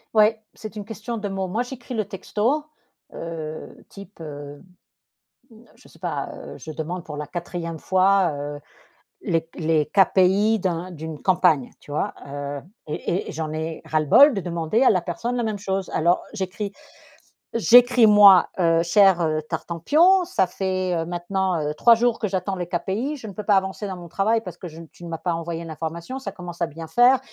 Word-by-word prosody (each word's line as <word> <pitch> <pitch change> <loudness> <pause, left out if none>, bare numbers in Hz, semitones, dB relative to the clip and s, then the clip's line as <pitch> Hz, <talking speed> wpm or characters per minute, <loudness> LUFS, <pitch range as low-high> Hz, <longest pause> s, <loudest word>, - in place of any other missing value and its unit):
Ouais, 215 +1 +4
c'est 215 0 -9
une 210 -1 -6
question 225 +2 -6
de 210 -1 -4
mots. 195 -1 -3
Moi, 215 +6 -1
j'écris 250 0 -7
le 220 -2 0
texto, 215 +8 -1 0.5
heu, 160 -2 -7
type, 200 -1 -13
heu, 145 -2 -8 0.9
mmh, - - -16 0.2
je - - -20
sais - - -20
pas, - - -3
heu, - - -10
je 160 - -8
demande 165 +3 -5
pour 150 -2 -7
la 150 0 -5
4e 170 0 -5
fois, 190 +1 +3
heu, 145 0 -5 0.6
les 165 -1 0
les 155 -2 +1
KPI 195 +3 +3
d'un 180 -1 -2
d'une 160 -2 -7
campagne, 180 -8 +2
tu - - -19
vois, 150 - -1
heu? 140 0 -5 0.3
Et 170 +4 -3
et - - -4
j'en 155 0 -4
ai 160 +1 -4
ras-le-bol 155 - +5
de 195 - -2
demander 170 +6 0
à - - +6
la 185 -4 +1
personne 230 +8 -3
la 240 - -1
même 215 -2 -2
chose. 195 -1 -3
Alors 170 +3 +2
j'écris 200 0 -4 0.8
j'écris, 245 +1 +6
moi, 205 -3 +8
heu: 165 -2 +3
«Cher, 190 +1 +5
heu, 155 -1 0
Tartempion, 320 - +3
ça 355 - 0
fait, 185 0 -2
heu, 165 -1 -1
maintenant, 175 +1 -1
heu, 150 0 -2
3 235 +8 +6
jours 235 0 +1
que 215 - -2
j'attends 190 +1 -2
les 180 -1 -3
KPI. 195 - -2
Je 230 - -9
ne 200 - -8
peux 210 - -6
pas 205 0 +3
avancer 190 +2 -2
dans 190 -2 -5
mon 175 -1 -10
travail 200 +7 +1
parce 185 -5 -8
que 180 - -8
je 160 - -13
n 165 0 -10
tu - - -17
ne 170 - -7
m'as 165 - -4
pas 175 - -1
envoyé 165 0 -5
l'information. 165 - -6
Ça 265 - -6
commence 175 -2 -9
à - - +3
bien 165 +1 -9
faire, 245 +9 +5
185 Hz, 195 wpm, -23 LUFS, 165-210 Hz, 0.9 s, moi